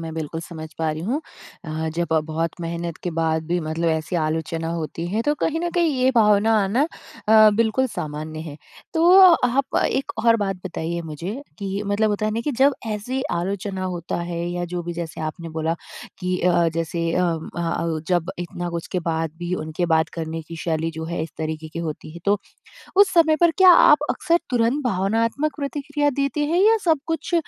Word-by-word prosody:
मैं 165 -1 -5
बिल्कुल 160 0 -4
समझ 160 -1 -8
पा 160 -1 +1
रही 155 0 -4
हूँ 250 - -1 0.4
अ, 160 0 -3
जब 170 0 0 0.2
बहुत 160 +1 -1
मेहनत 170 0 -4
के 175 - -2
बाद 160 -1 +1
भी 175 +2 0
मतलब 160 +1 -1
ऐसी 160 +2 -1
आलोचना 160 +1 -1
होती 165 0 -4
है 210 +5 0
तो 295 +4 +1
कहीं 325 +1 0
न 345 - -1
कहीं 340 -2 +3
ये 260 - +5
भावना 210 -1 +4
आना 205 +8 +1 0.5
अ, 215 -1 +8
बिल्कुल 230 +3 +2
सामान्य 155 -6 -5
है। 155 -2 -7 0.4
तो 345 +3 +6 0.3
आप 265 +2 0
एक 270 - -1
और 230 -1 +6
बात 195 -3 -1
बताइए 170 -1 -3
मुझे 165 +5 -5 0.2
कि 200 0 -3
मतलब 210 +2 +2
होता 205 +1 -1
है - - 0
ना? 225 - -1
कि 265 - -2
जब 275 +1 +5
ऐसी 225 +5 -3
आलोचना 190 +2 -2
होता 175 -2 -3
है 170 -1 -4
या 175 0 -2
जो 175 -1 -2
भी 175 +1 -4
जैसे 170 -2 -6
आपने 160 +2 -5
बोला 160 +1 -1 0.4
कि 180 -1 -1
अ, 175 -1 +3
जैसे 165 0 -1
अम 170 -3 0
अ - - -2
अ, 165 -1 -1
जब 175 -1 +1
इतना 175 0 -4
कुछ 170 +2 -4
बाद 165 -1 -1
भी 175 0 -4
उनके 160 +1 -2
बात 160 0 +2
करने 165 -1 -4
की 165 - -7
शैली 160 -1 0
जो 160 - -3
है 165 0 -3
इस 160 - -5
तरीके 155 0 -4
की 160 - -7
होती 155 -1 -5
है - - -7
तो, 205 +1 +3 0.6
उस 400 -1 +6
समय 320 -2 +5
पर 340 -1 +6
क्या 375 -1 +9
आप 300 -3 +7
अक्सर 335 +1 +2
तुरंत 245 +3 +1
भावनात्मक 230 +8 0
प्रतिक्रिया 290 0 -1
देते 280 +2 0
हैं 335 +4 +2
या 445 +1 +6
सब 320 -2 +4
कुछ 325 +1 -2
175 Hz, 200 wpm, -23 LUFS, 165-230 Hz, 0.6 s, क्या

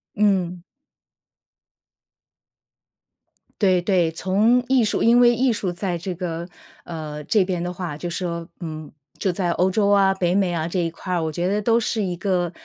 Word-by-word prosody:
嗯。 185 -4 +1 3.0
对 185 -4 +3
对， 175 -3 +2
从 210 +8 +2
艺 260 -2 +3
术 210 - 0
因 235 +1 +5
为 240 -1 +6
艺 250 +1 +2
术 195 -4 -2
在 175 0 -3
这 180 +2 -4
个， 170 -1 -4 0.4
呃， 155 -3 -6
这 195 +5 +2
边 180 -2 -2
的 175 - -3
话 175 -4 -5
就 175 +3 -5
说， 170 -1 -4
嗯， 155 -3 -7 0.3
就 190 - +1
在 175 -1 -1
欧 180 +2 +2
洲 200 +1 +2
啊， 195 -1 +4
北 180 -2 0
美 190 -3 +1
啊 160 -1 -1
这 180 +2 -2
一 170 -1 0
块 180 +3 -6
儿， 170 -2 0
我 160 - -2
觉 175 +3 -2
得 205 +2 0
都 230 +2 +3
是 225 -1 -1
一 180 -2 -2
个， 180 -2 0
180 Hz, 190 characters per minute, -22 LUFS, 170-200 Hz, 3.0 s, 为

